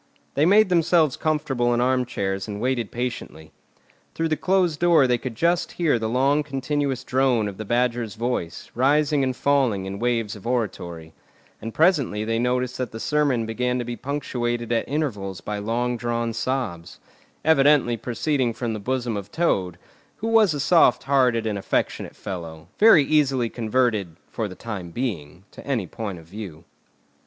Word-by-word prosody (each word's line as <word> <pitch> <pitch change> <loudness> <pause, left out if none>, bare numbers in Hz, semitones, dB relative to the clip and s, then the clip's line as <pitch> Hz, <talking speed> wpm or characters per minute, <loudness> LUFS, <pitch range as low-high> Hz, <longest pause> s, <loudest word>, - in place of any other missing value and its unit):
They 150 +3 +3
made 205 +1 +5
themselves 165 -4 +3
comfortable 135 -6 0
in - - 0
armchairs 120 -6 -1
and 105 -1 -5
waited 125 -2 -1
patiently. 120 -10 -5 0.6
Through 165 0 -1
the 155 - +2
closed 180 -1 +1
door 170 -5 +5
they 125 -1 +1
could 125 -2 -6
just 170 +6 +1
hear 160 -9 +1
the 110 0 -2
long 135 +5 +2
continuous 140 -1 -2
drone 125 -4 +1
of 100 -2 -7
the 110 - -6
Badger's 120 -1 0
voice, 115 -8 -3
rising 145 +3 +2
and 130 -1 -1
falling 130 -9 +1
in 95 +1 -5
waves 115 -3 -1
of 105 +2 -10
oratory; 85 -9 -3 0.5
and 115 - -5
presently 140 - +2
they 115 +1 0
noticed 125 +1 -1
that 125 -2 -3
the 110 - -7
sermon 140 -4 +1
began 125 +3 -1
to 120 - -3
be 120 0 -4
punctuated 120 -4 -3
at 115 - 0
intervals 105 - -2
by 105 0 -4
long 120 +3 -1
drawn 115 -1 -2
sobs, 115 -8 -3 0.5
evidently 145 -5 +4
proceeding 120 +1 -1
from 120 -3 -3
the 110 - -4
bosom 125 +1 -2
of 100 0 -6
Toad, 95 - 0 0.4
who 225 - -4
was 215 -8 +4
a - - -3
soft 165 +4 +4
hearted 125 -5 +2
and 105 -2 -2
affectionate - - -2
fellow, 80 -4 -7
very 210 -8 +7
easily 135 -5 +1
converted—for 110 -4 -1
the 95 - -9
time 100 -6 -6
being—to 90 - -6
any 125 -8 -1
point 100 0 -6
of 80 - -13
view. 90 -3 -9
120 Hz, 165 wpm, -23 LUFS, 110-140 Hz, 0.6 s, very